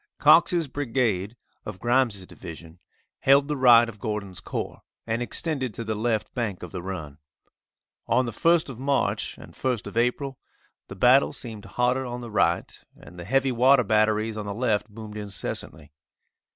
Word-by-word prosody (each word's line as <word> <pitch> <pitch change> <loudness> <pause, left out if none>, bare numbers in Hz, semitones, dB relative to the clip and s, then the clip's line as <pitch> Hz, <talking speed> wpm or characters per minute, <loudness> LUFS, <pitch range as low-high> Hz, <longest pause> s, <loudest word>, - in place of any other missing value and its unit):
Cox's 165 +2 +5
brigade, 120 -7 -1 0.3
of 105 -3 -8
Grimes' 120 -5 +1
division, 85 0 -11 0.4
held 140 +1 +4
the 150 - -1
right 120 -3 +6
of 110 -3 -10
Gordon's 105 -4 -4
corps - - -5 0.2
and 115 +1 -2
extended 130 -2 -2
to 115 - -5
the 110 -1 -2
left 110 0 -1
bank 110 -8 -3
of 90 - -8
the 90 - -5
run. 80 -6 -7 0.9
On 130 - +2
the 120 - -3
1st 165 +8 +2
of 125 -3 -8
March 140 +1 -1
and - - -13
1st 125 -4 -2
of - - -7
April, 125 +3 0 0.5
the - - -9
battle 125 +6 +4
seemed 110 -5 -7
hotter 125 +2 0
on 125 -1 -5
the 120 -2 -8
right, 85 -4 0
and 90 - -14
the 85 - -7
heavy 135 +5 +2
water 125 +2 +5
batteries 110 +1 +1
on 105 -1 -5
the 100 - -4
left 115 -3 0
boomed 105 0 -9
incessantly. 90 -7 -5
115 Hz, 165 wpm, -25 LUFS, 105-130 Hz, 0.9 s, right